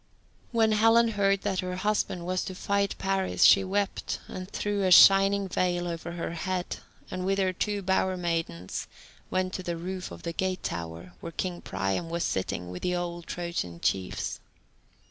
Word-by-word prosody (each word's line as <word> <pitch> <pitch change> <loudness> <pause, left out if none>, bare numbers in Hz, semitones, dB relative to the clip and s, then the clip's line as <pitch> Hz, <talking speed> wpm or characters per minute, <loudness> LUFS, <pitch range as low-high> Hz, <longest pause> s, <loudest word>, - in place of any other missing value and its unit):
When 225 -2 +3
Helen 225 +2 +5
heard 200 -2 +1
that 195 -3 0
her 180 0 -2
husband 185 -3 -1
was 185 +1 0
to 185 - -6
fight 200 +1 0
Paris, 190 -1 0
she 195 - +8
wept, 195 +1 -1
and 185 0 -7
threw 205 -1 -1
a 190 - +2
shining 195 +1 +7
veil 175 -1 0
over 170 0 -5
her 170 -1 -4
head, 180 +2 -3 0.3
and 185 0 -3
with 195 +1 +1
her 190 -1 +1
two 205 +2 -2
bower 190 0 +1
maidens 165 - -3 0.4
went 185 0 -1
to - - -3
the 175 -2 -3
roof 185 +2 -5
of - - -10
the 170 - -3
gate 185 +1 -2
tower, 85 +1 -5
where - - -7
king 175 +1 -3
Priam 95 - -2
was 170 0 -1
sitting 90 -1 -2
with 90 - -7
the 180 0 0
old 175 -1 -4
Trojan 170 - -4
chiefs. 95 +1 -1
185 Hz, 175 wpm, -28 LUFS, 170-195 Hz, 0.4 s, she